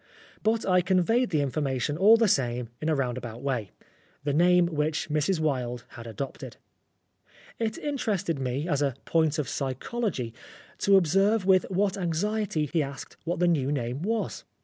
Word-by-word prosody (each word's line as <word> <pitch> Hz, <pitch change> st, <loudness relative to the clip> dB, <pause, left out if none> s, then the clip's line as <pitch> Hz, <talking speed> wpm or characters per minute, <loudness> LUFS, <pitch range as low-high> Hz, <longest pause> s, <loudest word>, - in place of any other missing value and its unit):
But 220 Hz, +1 st, +1 dB
I 180 Hz, -1 st, +4 dB
conveyed 190 Hz, +7 st, +2 dB
the 155 Hz, -5 st, +1 dB
information 140 Hz, 0 st, -1 dB
all 205 Hz, +7 st, +6 dB
the 225 Hz, -1 st, +3 dB
same 125 Hz, -, 0 dB
in 155 Hz, -, -1 dB
a 155 Hz, -, +2 dB
roundabout 125 Hz, -2 st, -3 dB
way 125 Hz, -8 st, -2 dB, 0.5 s
the 145 Hz, -1 st, 0 dB
name 175 Hz, +3 st, +5 dB
which 155 Hz, -2 st, -1 dB
Mrs. 155 Hz, +4 st, +1 dB
Wilde 125 Hz, -6 st, -1 dB
had 115 Hz, -1 st, -10 dB
adopted. 115 Hz, +5 st, -6 dB, 1.0 s
It 220 Hz, -1 st, -1 dB
interested 205 Hz, -, -2 dB
me, 135 Hz, +4 st, -2 dB
as 145 Hz, -4 st, 0 dB
a 140 Hz, -4 st, 0 dB
point 160 Hz, -2 st, +2 dB
of 150 Hz, -, -1 dB
psychology, 135 Hz, -, -3 dB, 0.5 s
to 200 Hz, -1 st, +5 dB
observe 195 Hz, +4 st, +3 dB
with 185 Hz, -1 st, +4 dB
what 195 Hz, +1 st, 0 dB
anxiety 180 Hz, -1 st, -1 dB
he 165 Hz, -, +3 dB
asked 140 Hz, -2 st, -6 dB
what 170 Hz, +1 st, -1 dB
the 175 Hz, +1 st, +2 dB
new 145 Hz, -5 st, +1 dB
name 125 Hz, -1 st, -2 dB
was. 220 Hz, +4 st, -2 dB
160 Hz, 160 wpm, -27 LUFS, 135-195 Hz, 1.0 s, all